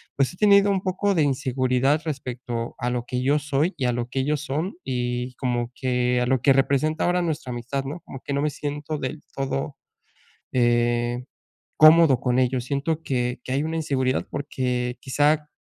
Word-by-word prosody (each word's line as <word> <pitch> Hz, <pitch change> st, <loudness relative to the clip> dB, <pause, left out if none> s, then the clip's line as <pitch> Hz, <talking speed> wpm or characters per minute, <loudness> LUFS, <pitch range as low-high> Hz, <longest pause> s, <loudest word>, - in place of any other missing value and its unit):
pues 135 Hz, +4 st, +1 dB
he -, -, -15 dB
tenido 200 Hz, -1 st, +5 dB
un 190 Hz, -1 st, 0 dB
poco 195 Hz, +2 st, 0 dB
de 165 Hz, -, +2 dB
inseguridad 135 Hz, +1 st, +1 dB
respecto 125 Hz, -5 st, -4 dB
a 120 Hz, 0 st, -1 dB
lo 120 Hz, -1 st, -2 dB
que 125 Hz, 0 st, -2 dB
yo 140 Hz, +3 st, +3 dB
soy 150 Hz, +4 st, 0 dB
y 130 Hz, -, -1 dB
a 125 Hz, -, +2 dB
lo 120 Hz, 0 st, -2 dB
que 135 Hz, +1 st, -1 dB
ellos 150 Hz, +1 st, 0 dB
son 155 Hz, +7 st, -3 dB
y 125 Hz, -1 st, -2 dB
como 120 Hz, -2 st, -2 dB
que 125 Hz, -1 st, 0 dB
a 125 Hz, -, +1 dB
lo 130 Hz, -1 st, +1 dB
que 135 Hz, -1 st, +5 dB
representa 140 Hz, +4 st, +1 dB
ahora 180 Hz, 0 st, +2 dB
nuestra 155 Hz, -6 st, -3 dB
amistad, 125 Hz, +3 st, -3 dB
¿no?, 145 Hz, +6 st, -6 dB
como 135 Hz, -, -9 dB
que 140 Hz, -, -4 dB
no 140 Hz, -, 0 dB
me 150 Hz, -, +1 dB
siento 145 Hz, +2 st, -4 dB
del 145 Hz, +2 st, -5 dB
todo, 135 Hz, +1 st, -2 dB, 0.8 s
eh, 120 Hz, 0 st, +1 dB, 0.5 s
cómodo 155 Hz, -3 st, +7 dB
con 125 Hz, 0 st, +1 dB
ellos, 125 Hz, -1 st, +1 dB
siento 150 Hz, +4 st, -2 dB
que 125 Hz, -3 st, -2 dB
que -, -, -9 dB
hay 140 Hz, +3 st, 0 dB
una 160 Hz, +1 st, -2 dB
inseguridad 130 Hz, -4 st, 0 dB
porque 125 Hz, -3 st, -2 dB
quizá 150 Hz, +2 st, +1 dB
135 Hz, 190 wpm, -24 LUFS, 125-150 Hz, 0.8 s, cómodo